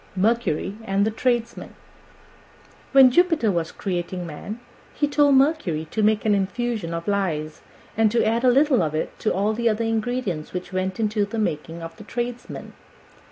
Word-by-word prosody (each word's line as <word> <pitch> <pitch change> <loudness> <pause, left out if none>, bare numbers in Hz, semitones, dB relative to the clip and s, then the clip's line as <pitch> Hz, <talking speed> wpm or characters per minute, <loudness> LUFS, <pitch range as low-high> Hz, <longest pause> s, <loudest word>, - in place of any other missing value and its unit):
MERCURY 205 -2 0
AND 195 -1 +1
THE 220 - 0
TRADESMEN 240 +1 -2 1.2
When 270 -2 +7
Jupiter 325 - +3
was 170 -3 -2
creating 180 -1 -4
man, 185 +8 -7 0.4
he 295 - +1
told 290 -1 +4
Mercury 265 - +2
to 220 - -1
make 215 0 +2
an 215 - +4
infusion 205 -1 -1
of 165 +2 -5
lies, 160 -7 -1 0.3
and 225 0 +4
to 235 +2 +1
add 230 +2 +1
a 255 - +6
little 270 -1 +4
of 155 -2 -1
it 155 - -2
to 215 - 0 0.3
the 235 0 +1
other 225 +1 0
ingredients 225 -7 -2
which 180 0 -5
went 185 0 -1
to 210 -1 0
the 205 +3 -6
making 165 -4 -3
of 165 0 -8
the - - -10
Tradesmen. 240 +2 -5
215 Hz, 165 wpm, -23 LUFS, 180-240 Hz, 1.2 s, When